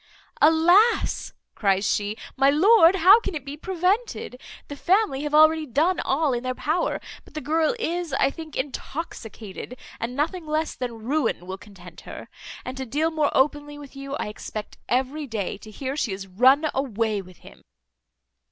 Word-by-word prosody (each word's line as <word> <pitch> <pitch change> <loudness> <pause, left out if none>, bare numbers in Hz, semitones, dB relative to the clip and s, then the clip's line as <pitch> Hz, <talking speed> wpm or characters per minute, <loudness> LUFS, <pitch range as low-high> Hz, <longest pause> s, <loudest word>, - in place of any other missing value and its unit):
"Alas!" 345 +9 +4 0.2
cries 195 -1 +1
she, 205 +1 -1 0.2
"my 270 +1 +4
lord, 345 +3 +6
how 385 +5 +7
can 395 -6 -5
it 290 -3 -5
be 280 +1 -6
prevented? 365 - -2 0.3
The 285 - -7
family 365 -2 +1
have 295 0 -1
already 310 0 +5
done 315 +9 +1
all 285 0 +1
in 240 - -1
their 255 0 -3
power; 320 +7 -1 0.2
but - - -20
the - - -2
girl 315 +6 +1
is, 350 -6 -2
I 270 - +2
think, 320 -1 -9
intoxicated, 250 - -6 0.2
and 240 +2 -4
nothing 320 +4 -2
less 310 +1 -1
than 235 -3 -6
ruin 260 - 0
will 190 +1 -6
content 185 -5 -14
her. - - -10 0.4
And 255 - -5
to 265 - -4
deal 305 +7 0
more 310 -2 +1
openly 290 +1 +1
with 285 -1 -12
you, 275 0 -6
I 250 - -3
expect 210 0 -8
every 265 +4 -1
day 220 -6 -3
to 215 - -12
hear 265 +5 -5
she 240 -9 -1
is 195 0 -6
run 255 +11 +4
away 225 -6 -1
with 180 -2 -16
him." - - -15
285 Hz, 170 wpm, -24 LUFS, 235-320 Hz, 0.4 s, how